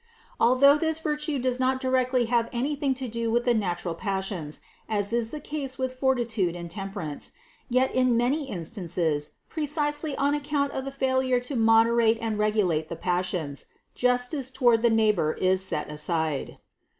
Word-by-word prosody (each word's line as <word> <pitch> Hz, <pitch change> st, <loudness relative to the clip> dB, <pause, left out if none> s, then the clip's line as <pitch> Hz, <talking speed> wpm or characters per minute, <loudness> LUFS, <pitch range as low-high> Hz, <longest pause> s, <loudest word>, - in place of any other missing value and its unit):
Although 275 Hz, +5 st, +5 dB
this 320 Hz, 0 st, +1 dB
virtue 300 Hz, -1 st, -2 dB
does 255 Hz, 0 st, -1 dB
not 260 Hz, 0 st, +1 dB
directly 255 Hz, -1 st, +1 dB
have 235 Hz, 0 st, +1 dB
anything 275 Hz, +2 st, -1 dB
to 255 Hz, 0 st, -4 dB
do 230 Hz, 0 st, -2 dB
with 240 Hz, +1 st, +1 dB
the 245 Hz, -, +4 dB
natural 180 Hz, -5 st, -1 dB
passions, 190 Hz, -5 st, -3 dB, 0.3 s
as 205 Hz, 0 st, 0 dB
is 235 Hz, -1 st, +1 dB
the 300 Hz, -, -6 dB
case 285 Hz, -3 st, -4 dB
with 260 Hz, -1 st, -2 dB
forti 265 Hz, -3 st, +2 dB
tude 195 Hz, -7 st, -1 dB
and 170 Hz, -1 st, -7 dB
temperance, 195 Hz, -7 st, -6 dB, 0.4 s
yet 255 Hz, +2 st, +2 dB
in 255 Hz, -2 st, +3 dB
many 270 Hz, +4 st, 0 dB
instances, 170 Hz, -5 st, -2 dB
precisely 295 Hz, -1 st, -1 dB
on 280 Hz, +1 st, +1 dB
account 290 Hz, -1 st, -1 dB
of 265 Hz, -, -4 dB
the 275 Hz, -, -4 dB
failure 260 Hz, -2 st, +1 dB
to 250 Hz, +3 st, -5 dB
moderate 225 Hz, 0 st, +4 dB
and 220 Hz, -2 st, -2 dB
regulate 190 Hz, -7 st, +1 dB
the 170 Hz, -, -4 dB
pas 180 Hz, +1 st, 0 dB
sions, 150 Hz, -7 st, -4 dB, 0.3 s
justice 250 Hz, +2 st, 0 dB
toward 245 Hz, -4 st, +3 dB
the 235 Hz, -, +4 dB
neighbor 210 Hz, -8 st, +2 dB
is 185 Hz, 0 st, +1 dB
set 150 Hz, -5 st, -3 dB
aside. 155 Hz, -1 st, -2 dB
235 Hz, 165 wpm, -26 LUFS, 190-265 Hz, 0.4 s, Although